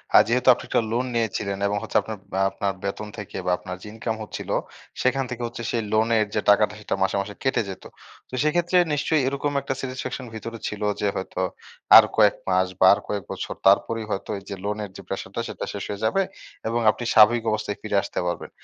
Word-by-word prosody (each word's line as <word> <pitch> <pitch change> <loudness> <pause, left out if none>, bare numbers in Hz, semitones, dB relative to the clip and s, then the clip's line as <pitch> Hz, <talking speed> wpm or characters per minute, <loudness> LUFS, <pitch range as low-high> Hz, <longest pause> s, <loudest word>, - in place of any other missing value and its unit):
আর - - +10
যেহেতু 125 +2 0
আপনি - - -8
একটা - - +3
লোন 120 +3 0
নিয়েছিলেন 100 -3 -1
এবং 105 0 0
হচ্ছে 115 - 0
আপনার 110 -1 -6 0.2
বা 95 - 0
আপনার 100 0 -2
বেতন 100 +2 -3
থেকে 105 -3 -7
বা 90 - +2
আপনার 90 0 -7
যে - - -10
ইনকাম 110 0 -3
হচ্ছিলো 105 - -4 0.5
সেখান 135 +1 +2
থেকে 125 -1 -5
হচ্ছে 120 0 -7
সেই 115 - 0
লোনের 110 0 +3
যে 105 - +2
টাকাটা 105 0 +5
সেইটা 105 - -2
মাসে, 95 - +1
মাসে 100 +1 -7
কেটে 130 - +2
যেতো। 95 - -8 0.4
তো - - -23
সেইক্ষেত্রে 175 +4 +2 0.2
নিশ্চয়ই 150 +1 +2
এরকম 140 +2 -1
একটা 135 0 -2
satisfaction 130 0 -5
ভেতরে 115 +1 -6
ছিলো 105 0 -3 0.2
যে 105 - +2
হয়তো 95 -1 -4 0.6
আর - - +10
কয়েক - - +6
মাস 95 0 +3
বা - - +6
আর 100 - -1
কয়েক 100 -2 -2
বছর - - -4
তারপরেই 110 +3 +3
হয়তো 95 - -3
এইযে 100 +1 -7
লোনের 105 0 -3
যে - - -8
প্রেশারটা - - -4
সেটা - - -5
শেষ - - -4
হয়ে 100 -1 -5
যাবে 195 +13 +2 0.5
এবং 115 +1 0
আপনি 120 - -7
স্বাভাবিক 110 +2 +6
অবস্থায় 105 -1 -2
ফিরে 110 -1 -3
আসতে - - -4
পারবেন। 85 0 -3
110 Hz, 205 wpm, -24 LUFS, 100-120 Hz, 0.6 s, আর